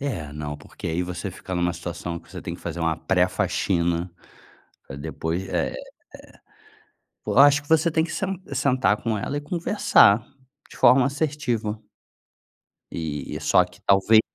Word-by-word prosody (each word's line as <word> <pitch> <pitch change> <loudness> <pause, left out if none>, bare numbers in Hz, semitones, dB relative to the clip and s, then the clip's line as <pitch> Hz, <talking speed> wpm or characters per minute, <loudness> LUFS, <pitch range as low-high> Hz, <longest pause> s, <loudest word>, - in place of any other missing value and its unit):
É, 90 - -4
não, 75 -1 -5
porque 75 - -10
aí 85 +2 -1
você 90 +2 -5
fica 95 +1 -9
em - - -1
uma 85 0 +1
situação 85 0 -5
que 85 - -20
você 95 - -8
tem 85 - -5
que - - -12
fazer 85 0 -5
uma 80 -1 0
pré-faxina, 85 +1 0 0.8
pra 70 - -8
depois 80 +6 -4
é - - 0
é - - -6 1.5
pô, - - -2
acho 145 +1 +7
que 145 - -20
você 160 +1 +3
tem 160 0 +1
que 165 - -6
sen 195 -1 -3
sentar 130 -5 +1
com 110 -2 -1
ela 140 - -3
e - - -1
conversar 145 - +3 0.5
de - - -13
forma 125 +2 +6
assertiva. 135 -7 -2 1.1
E 75 -4 -4
e - - -6
só - - +4
que - - -17
talvez 100 +3 +5
100 Hz, 165 wpm, -24 LUFS, 85-140 Hz, 1.5 s, acho